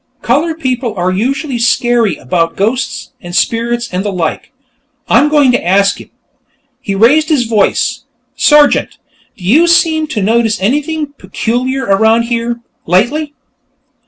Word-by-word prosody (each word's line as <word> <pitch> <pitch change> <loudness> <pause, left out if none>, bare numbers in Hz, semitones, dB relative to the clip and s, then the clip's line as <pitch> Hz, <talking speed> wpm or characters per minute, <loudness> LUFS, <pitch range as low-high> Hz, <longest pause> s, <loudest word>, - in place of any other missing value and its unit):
Colored 325 +1 0
people 250 -5 -2
are 180 0 -1
usually 260 - -2
scary 235 -4 +1
about 165 +5 -2
ghosts 255 +6 -2
and 175 0 -8
spirits 235 +2 0
and 185 +1 -1
the 205 - -2
like.... 175 -4 -3 0.6
I'm 295 - +3
going 290 -4 +4
to 245 - 0
ask 195 +3 +2
him." - - -15 0.7
He 200 -6 -4
raised 285 - +3
his 295 -6 +2
voice. 220 -3 0 0.3
"Sergeant, 295 -1 +3 0.4
do - - -14
you 290 - +3
seem 320 -2 +2
to 225 -9 -3
notice 225 0 +1
anything 290 +7 -2
peculiar 245 +7 -2
around 220 +4 +3
here, 235 0 -3 0.3
lately?" 280 - 0
235 Hz, 135 wpm, -13 LUFS, 200-285 Hz, 0.7 s, going